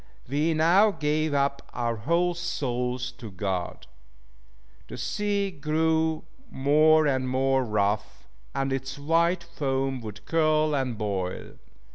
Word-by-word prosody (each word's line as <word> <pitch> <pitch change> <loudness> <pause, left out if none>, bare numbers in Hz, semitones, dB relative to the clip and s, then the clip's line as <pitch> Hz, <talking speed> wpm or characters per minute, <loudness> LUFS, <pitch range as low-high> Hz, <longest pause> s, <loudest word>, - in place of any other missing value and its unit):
We 150 +5 +1
now 175 +7 +5
gave 155 -4 0
up 140 0 +1
our 120 -1 -1
whole 170 +10 +1
souls 125 -6 -2
to 115 - -7
God. 95 -2 -4 1.0
The - - -8
sea 200 - -1
grew 160 0 0 0.3
more 155 +3 +4
and 130 -3 0
more 135 +1 +2
rough, 105 -2 -1 0.3
and 135 0 0
its 135 +1 -4
white 170 +4 +1
foam 135 -5 -2
would 105 -3 -9
curl 155 -2 +2
and 130 -4 -1
boil. 95 -4 -3
140 Hz, 120 wpm, -26 LUFS, 125-160 Hz, 1.0 s, now